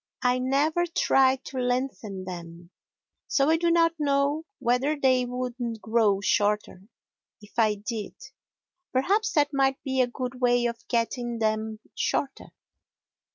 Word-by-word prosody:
I 250 0 +2
never 295 +7 +1
try 265 -5 +3
to 260 - -6
lengthen 245 -6 -2
them, 170 -1 -9 0.6
so 280 +2 +2
I 325 - +4
do 340 +1 +1
not 335 0 +4
know 285 +2 +1
whether 265 +4 0
they 255 -2 +3
would 250 0 -4 0.3
grow 215 -3 +2
shorter 205 -2 0 0.6
if 210 +2 -9
I 215 -2 +3
did. 210 +1 -5 0.8
Perhaps 405 - +1
that 290 -1 +2
might 270 -1 +2
be 265 -1 +1
a 250 - +2
good 250 +1 -6
way 245 -1 +3
of 235 -1 -4
getting 240 0 -1
them 220 0 -1 0.2
shorter. 275 -1 -2
250 Hz, 135 wpm, -26 LUFS, 220-275 Hz, 0.8 s, I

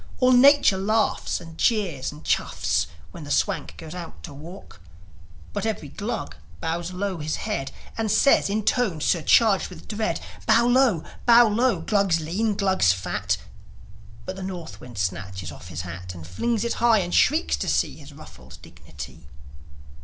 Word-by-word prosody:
All 255 0 +4
nature 255 -6 +6
laughs 215 +3 0
and 165 -1 -12
jeers 185 - +1
and 150 +1 -13
chaffs - - 0 0.2
When 170 - -9
the 145 - -9
Swank - - -1
goes 160 0 -9
out 175 -2 -9
to 150 - -8
walk; 160 - -12 0.7
But 205 - -3
every 215 -10 -3
Glug 215 - -5 0.2
bows 170 +2 -3
low 185 -1 -3
his 155 +1 -2
head, 135 0 -3 0.3
And 220 -1 0
says 220 +2 +4
in 210 +2 -1
tones 215 - +1
surcharged 195 +4 +3
with 175 -3 -12
dread, 215 0 -2 0.3
"Bow 230 +2 +5
low, 245 -8 +3 0.2
bow 235 0 +8
low, 235 +4 +1
Glugs 195 -5 +2
lean, 200 +7 -1
Glugs 190 - +3
fat!" 95 +1 -1 0.9
But 185 - -5
the 190 - -8
North 180 -3 -7
wind 120 -4 -11
snatches 95 -1 -3
off 75 +3 -12
his 85 -1 -5
hat, 90 0 -8
And 85 -2 -9
flings 215 - -1
it 235 - 0
high, 235 -2 +5
and 180 -3 -2
shrieks 310 +4 +3
to - - -3
see - - 0
His 145 -1 -13
ruffled 70 - -13
dignity. 75 -5 -11
175 Hz, 165 wpm, -24 LUFS, -, 0.9 s, bow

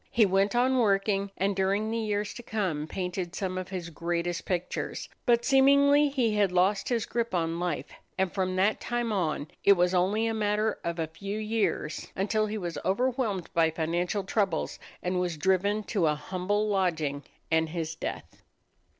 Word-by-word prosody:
He 230 -3 +4
went 195 +3 +2
on 255 +1 +3
working, 200 -2 +2
and 195 +1 +1
during 200 +3 +1
the 230 - -1
years 210 -1 -1
to 240 - -8
come 185 -10 -2
painted 180 0 -4
some 185 -2 -2
of 185 -1 -4
his 180 -3 -5
greatest 170 +1 -2
pictures; 180 -1 -3 0.2
but 235 -1 +4
seemingly 280 +2 +5
he 250 -6 +1
had 205 -3 +2
lost 185 +3 +2
his 235 -4 0
grip 235 -4 -2
on 165 -1 0
life, 175 -3 -2 0.3
and 190 -1 0
from 185 -1 -1
that 195 +3 +2
time 240 -1 -1
on 165 -7 -1 0.2
it 200 - +7
was 180 -1 +2
only 195 +5 +2
a 225 - 0
matter 210 0 0
of 170 0 -2
a 165 - 0
few 195 +6 -6
years 215 -8 -1
until 215 +3 +1
he 215 +1 -3
was 170 -6 -4
overwhelmed 220 -2 0
by 165 -1 +4
financial 175 +5 -1
troubles 195 -3 -1 0.2
and 180 0 0
was 175 -3 -1
driven 190 +6 +1
to 195 -6 +1
a 150 - +2
humble 185 +7 -1
lodging 160 -8 0 0.3
and 160 0 +2
his 160 -1 -3
death. 160 - -6
195 Hz, 175 wpm, -28 LUFS, 175-215 Hz, 0.3 s, it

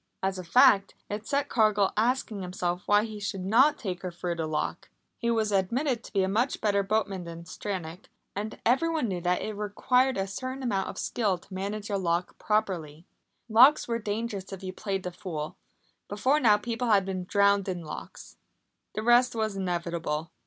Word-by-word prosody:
As 190 -1 0
a - - -5
fact, 200 +1 +5 0.2
it 210 +1 -4
set 285 0 0
Cargill 210 -4 +3
asking 225 -2 0
himself 180 -1 -2
why 205 0 +5
he 215 -2 -6
should 200 -2 -4
not 260 +9 +5
take 185 -5 -4
her 185 - -3
through 175 0 -3
the 165 -2 -3
lock. 155 -1 -3 0.3
He 235 - 0
was 220 -2 +1
admitted 235 +6 0
to - - -11
be 195 -2 +2
a - - +1
much 230 +7 0
better 200 -2 +2
boatman 200 -2 -1
than 170 0 -8
Stranack, 185 -1 -6 0.3
and 210 +2 -4
everyone 305 +2 +2
knew 185 -3 -3
that 180 +1 0
it 215 - -3
required 250 +5 +1
a 195 - 0
certain 255 +7 -5
amount 200 -6 0
of - - -8
skill 205 -6 0
to 185 - -16
manage 205 +3 -4
a 200 - +1
lock 175 0 -1
properly. 175 -7 -1 0.4
Locks 250 +7 +6
were 230 -1 -1
dangerous 210 -2 -4
if 195 0 -8
you 185 0 -5
played 195 -1 -3
the 180 - -4
fool. 160 -4 -5 0.5
Before 255 +9 +2
now 215 -6 +5
people 230 +3 -3
had 200 -4 +4
been 185 -2 -3
drowned 200 0 +3
in 175 -2 -3
locks. 155 - -9 0.6
The 215 - -2
rest 240 +1 +4
was 220 -2 -1
inevitable. 170 -4 -2
200 Hz, 190 wpm, -28 LUFS, 185-225 Hz, 0.6 s, Locks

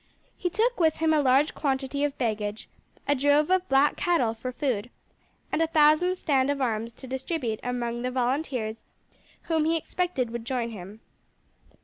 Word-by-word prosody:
He 355 - -2
took 455 +6 0
with 320 -2 +3
him 320 0 +2
a 305 - +4
large 270 +2 +3
quantity 275 0 -1
of 290 -1 -1
baggage, 215 -3 -2 0.4
a 285 - +4
drove 290 +4 +3
of 370 0 +2
black 270 +2 +4
cattle 270 -11 +1
for 240 +3 -5
food, 245 -4 -2 0.6
and - - 0
a 325 - +3
thousand 315 +3 +4
stand 275 -6 +1
of 285 0 0
arms 230 -3 -1
to 260 - -12
distribute 260 -3 -3
among 240 -1 -3
the 250 - -1
volunteers 250 -3 -2 0.6
who 320 -2 0
he 325 +1 +2
expected 325 -7 -2
would 235 -1 -5
join 240 -1 -2
him. 205 +1 -10
270 Hz, 165 wpm, -27 LUFS, 240-315 Hz, 0.6 s, a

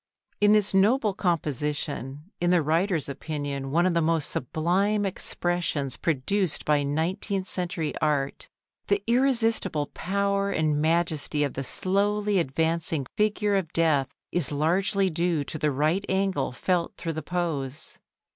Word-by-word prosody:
In 205 0 +5
this 210 -2 +3
noble 210 +3 +3
composition, 150 - -2
in 175 - +2
the 175 -3 +4
writer's 165 +2 +1
opinion 140 -1 -4
one 170 +5 +2
of 185 - +2
the 170 - +2
most 160 -2 +1
sublime 190 - 0
expressions 175 -7 -1
produced 165 +4 0
by 150 -1 +3
nineteenth 180 +7 -1
century 170 -5 -2
art, 145 -3 0 0.4
the 200 0 +1
irresistible 230 - +2
power 200 +1 0
and 155 -4 +1
majesty 160 -2 +1
of 140 - -2
the 135 - -4
slowly 205 +6 +1
advancing 160 0 -1
figure 210 -1 +1
of 180 -5 -1
Death 155 -5 +2 0.2
is 175 -5 +2
largely 185 +6 +1
due 170 -2 0
to 155 - -6
the 150 - +2
right 155 +7 +1
angle 190 -8 0
felt 175 +6 -1
through 165 -2 -3
the 160 - -4
pose. 155 -7 -3
170 Hz, 135 wpm, -26 LUFS, 150-195 Hz, 0.4 s, In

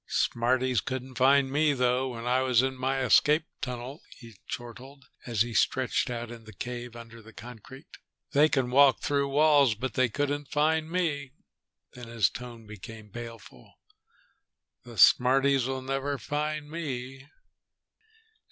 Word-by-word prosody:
"Smarties 125 +1 +1
couldn't 130 0 -5
find 135 +1 +3
me 150 +1 +2
though, 125 0 0
when 115 +1 -7
I 125 +1 +2
was 130 -2 +3
in 130 0 -1
my 130 +1 -1
escape 150 +4 +4 0.2
tunnel," 125 +4 -6 0.2
he 115 -3 -13
chortled, 130 +3 -9 0.2
as 115 -3 +2
he 120 0 -7
stretched 130 +4 +1
out 120 -1 -5
in 115 -1 -11
the 110 - -12
cave 120 +3 -7
under 115 0 -11
the 110 0 -16
concrete. 125 +5 -12 0.5
"They 150 +2 +4
can 130 -4 0
walk 140 +1 +5
through 140 -1 0
walls, 145 -4 +4
but 125 +3 -4
they 130 -1 +2
couldn't 145 +3 -2
find 155 +1 +1
me." 150 -7 -2 0.6
Then 125 -1 -10
his 115 -2 +1
tone 120 -2 -9
became 105 +1 -11
baleful. 115 +1 -11 1.1
"The 120 -2 -12
smarties'll 135 +1 +4
never 135 +1 -2
find 150 +3 -3
me." 135 -4 -6
130 Hz, 145 wpm, -28 LUFS, 120-140 Hz, 1.1 s, walk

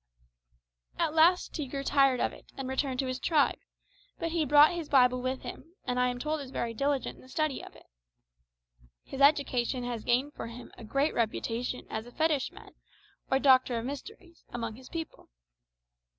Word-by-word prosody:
At 325 -2 0
last 335 +3 +4
he 300 -3 -3
grew 275 +1 -4
tired 275 -2 +3
of - - 0
it, - - -15
and 270 -1 -4
returned 265 0 -1
to - - -3
his 255 0 -3
tribe; 305 -4 +2 0.6
but 330 - -3
he 330 -2 +1
brought 295 +3 +7
his 335 -3 -5
Bible 250 -2 +4
with 255 +1 -3
him, 330 +6 -9
and 250 0 -1
I 250 - +3
am 245 0 -2
told 305 +4 -2
is 270 - -8
very 235 -3 -3
diligent 275 +3 -1
in - - -16
the 255 - -17
study 310 0 -1
of - - -12
it. - - -17 1.2
His 270 - -7
education 270 -3 +3
has 240 -3 -4
gained 260 +5 +1
for - - -6
him 235 +1 -10
a - - -12
great 275 +7 0
reputation 235 +2 -2
as 220 +2 -5
a - - -12
fetishman, 310 -1 -1 0.6
or 265 - +3
doctor 260 -3 +4
of 230 - -3
mysteries, 335 - -9
among 230 -2 -4
his 255 +2 -13
people. 325 -2 -7
265 Hz, 185 wpm, -30 LUFS, 250-300 Hz, 1.2 s, brought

